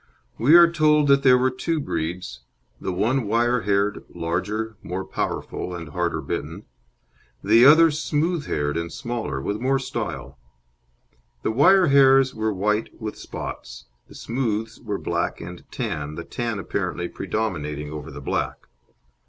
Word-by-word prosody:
We 140 +8 +6
are 170 0 +9
told 155 -3 +3
that 140 0 +5
there 130 -2 +6
were 130 +1 +2
two 160 +5 -2
breeds: 80 - -4 0.4
the - - -3
one 110 +6 0
wire 120 +3 +2
haired, 100 +1 0
larger, 95 +7 -3
more 95 +2 -5
powerful, 90 -1 -4
and 85 -3 -7
harder 75 - -2
bitten; - - -5 0.8
the 115 +5 +6
other 160 +2 +7
smooth 155 +2 -1
haired 75 +1 -1
and 85 0 -3
smaller, 120 - -4
with 100 +11 -3
more 135 +2 +2
style. 70 - -5 1.0
The - - 0
wire 185 +10 +5
hairs 135 -1 +5
were 110 0 -1
white 105 +3 -1
with 110 -1 -5
spots, 65 +1 -8 0.2
the - - -15
smooths 115 -2 -3
were 105 -4 -4
black - - -2
and - - -9
tan, 75 -1 -4
the 85 - -6
tan 115 -3 -3
apparently 90 -2 -3
predominating 75 -11 -3
over 75 0 -7
the 70 -1 -9
black. - - -3
110 Hz, 145 wpm, -23 LUFS, 85-135 Hz, 1.0 s, are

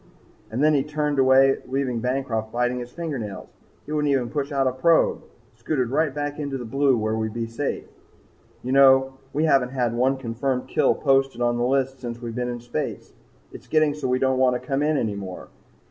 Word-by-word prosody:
And 125 +6 -1
then 155 0 +5
he 140 - +3
turned 150 0 -1
away 135 +1 +5
leaving 130 -2 -1
Bancroft 125 -3 -2
biting 125 +1 0
his 120 0 -7
fingernails. 135 - -5 0.4
He 150 - -9
wouldn't 150 -1 +1
even 125 -4 0
push 145 +1 -2
out 135 -1 +1
a 130 - +2
probe 160 +6 +2 0.3
scooted 130 -6 -2
right 155 +1 +1
back 145 +1 -4
into 140 -2 -3
the 125 - -7
blue 135 +2 +2
where 110 0 -1
we'd 110 0 -3
be 115 -1 -2
safe! 115 +5 -4 0.8
"You 125 - -3
know, 135 0 +5
we 150 +3 0
haven't 135 -5 +3
had 125 -3 -1
one 130 +3 +1
confirmed 125 +1 -2
kill - - +2
posted 135 -3 +1
on 120 0 +1
the - - +1
list 135 0 0
since 120 -1 -5
we've 120 -1 -6
been 125 +1 -2
in 120 -1 -5
space. 120 -10 -5 0.4
It's - - -12
getting 155 -2 +2
so 145 -3 -4
we 125 0 +2
don't 130 0 +1
want 125 -1 +3
to - - -18
come 135 -1 0
in 150 0 +1
any 110 -5 -1
more. 95 -2 -8
130 Hz, 205 wpm, -24 LUFS, 120-140 Hz, 0.8 s, then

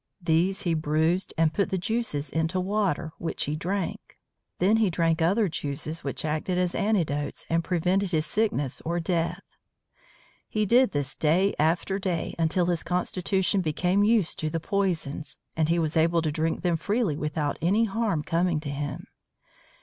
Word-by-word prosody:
These 175 +2 +1
he 170 - +1
bruised 160 +3 +1
and 160 -1 +3
put 200 - +1
the 190 - 0
juices 185 -7 -2
into 160 +3 0
water, 185 -4 0
which 165 - -3
he 150 - -2
drank. 180 +3 -4 0.4
Then 200 +5 +3
he 220 -3 +3
drank 165 -1 +1
other 195 +6 +3
juices 155 0 -3
which 140 +2 -4
acted 155 +4 -1
as 180 -1 +1
antidotes 165 -9 0
and 165 0 +2
prevented 185 +3 +1
his 155 -3 0
sickness 160 - -1
or 170 +2 -1
death. 170 +2 -1 1.1
He 215 -1 0
did 245 +5 +5
this 145 -2 -2
day 180 +6 +2
after 170 +5 +1
day 185 -4 -2
until 165 +2 +2
his 175 -2 0
constitution 185 +2 0
became 180 +4 +1
used 215 -5 +2
to 155 - -1
the 165 +1 -2
poisons, 165 -6 -2 0.2
and 160 -1 +1
he 170 - +3
was 160 -1 0
able 165 +1 +3
to 155 - 0
drink 160 +3 -1
them 175 -2 +2
freely 205 -1 0
without 150 -1 -2
any 200 +7 +3
harm 205 -7 -1
coming 170 0 +1
to 145 -2 -4
him. 145 +1 -4
170 Hz, 165 wpm, -26 LUFS, 155-190 Hz, 1.1 s, did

